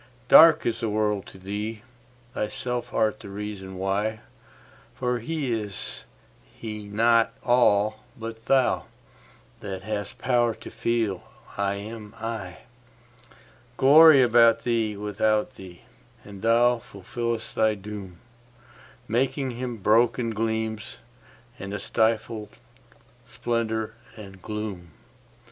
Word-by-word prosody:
Dark 160 -1 +8
is 115 -1 -1
the 115 -2 -1
world 105 -1 0
to - - -12
thee: 105 +3 -5 0.5
thyself 120 +3 -3
art 110 0 +1
the - - -10
reason 100 -1 -6
why; 100 +3 -1 0.7
For 125 -1 -1
is 115 - -4 0.4
He 105 -2 -8
not 115 +2 +3
all 110 -3 +3 0.2
but 115 0 -8
thou, 135 -2 +2 0.7
that 95 -2 -6
hast 105 -1 -4
power 120 -3 +1
to - - -11
feel 110 -6 -1 0.3
'I 100 0 0
am 105 +1 -8
I'?Glory 120 - +2
about 115 -1 +5
thee, 115 -3 0
without 105 +3 0
thee; 90 -2 -12 0.4
and 100 -2 -11
thou 120 +1 +4
fulfillest 115 +3 -5
thy 110 -1 +2
doom, 100 -3 -9 0.9
Making 130 +3 0
Him 120 0 -5
broken 115 +3 +2
gleams, 110 -1 -3 0.6
and 100 +1 -5
a - - -4
stifled 110 0 0 0.8
splendour 110 -2 -2 0.2
and 95 -3 -11
gloom. 100 -6 -6
110 Hz, 105 wpm, -25 LUFS, 105-120 Hz, 0.9 s, Dark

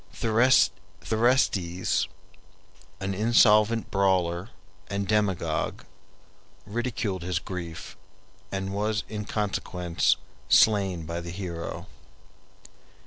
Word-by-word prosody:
Thersites, 110 -4 +2 0.9
an 100 0 -2
insolent 110 +1 +4
brawler 95 -1 +1 0.4
and 100 -1 -2
demagogue, 95 -7 0 0.8
ridiculed 110 -3 -3
his 90 0 -1
grief, 85 -4 -6 0.6
and 95 0 -3
was 105 +1 -1
in 105 -1 -5
consequence 90 -5 0 0.3
slain 95 -6 +4
by 85 +2 -4
the 85 - -7
hero. 85 -2 -5
100 Hz, 80 wpm, -26 LUFS, 90-110 Hz, 0.9 s, insolent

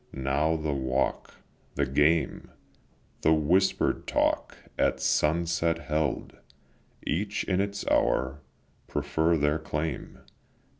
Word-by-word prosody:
Now 70 +4 +1
the 80 -2 -2
walk, 65 0 -1 0.4
the 70 - +1
game, 75 +5 +1 0.7
The 80 - +4
whisper'd 90 +6 +1
talk - - 0 0.2
at - - +1
sunset 85 +1 +1
held, 75 -1 -2 0.7
Each 100 +6 -1
in 95 0 +1
its 100 0 -3
hour, 65 +3 +1 0.5
prefer 80 +3 +1
their 75 +1 +1
claim. 75 0 -4
75 Hz, 100 wpm, -28 LUFS, 70-85 Hz, 0.7 s, The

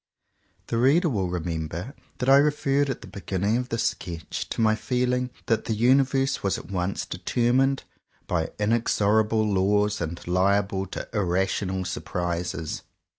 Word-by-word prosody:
The 115 - -1
reader 155 +8 +4
will 95 -8 -1
remember 85 - -4 0.2
that 125 - -2
I 135 +1 +8
referred 145 -1 +2
at 135 - -3
the 110 - -10
beginning 100 +3 -1
of 125 +1 -3
this 115 - -1
sketch 85 -3 -3
to - - -5
my 110 -1 +4
feeling 125 +2 0 0.2
that 115 -2 +1
the 110 - -1
universe 135 +3 +3
was 100 - 0
at - - -10
once 90 0 -2
determined 125 +8 +1 0.4
by 80 -2 -1
inexorable 110 0 +2
laws 105 +1 +2
and 85 +1 -3
liable 95 +2 +1
to - - -6
irrational 95 -1 0
surprises. 85 -3 -3
105 Hz, 140 wpm, -25 LUFS, 90-125 Hz, 0.4 s, I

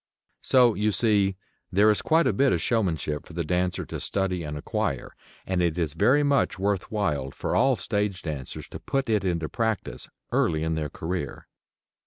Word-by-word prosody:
So, 125 -3 +5
you 105 +1 +1
see, 100 -3 +2 0.4
there 105 +3 +5
is 105 - 0
quite 165 +1 +3
a - - +2
bit 135 0 +3
of - - +1
showmanship 80 - -1
for - - -12
the 85 0 -2
dancer 90 +2 -1
to - - -6
study 95 -2 -1
and 75 -2 -5
acquire, 75 - -2 0.3
and 95 -1 0
it 85 -1 +1
is 80 -4 -1
very 135 - +4
much 140 -7 +2
worth 100 0 -1
while 75 -11 -1
for - - -3
all 135 -1 +4
stage 105 -5 -2
dancers 75 -5 -6
to - - -8
put 135 -4 -1
it 105 -2 +2
into 85 -4 -1
practice, 110 - -2 0.2
early 80 -2 +1
in 80 0 0
their 75 -2 -2
career. 80 -2 -4
95 Hz, 185 wpm, -26 LUFS, 80-110 Hz, 0.4 s, So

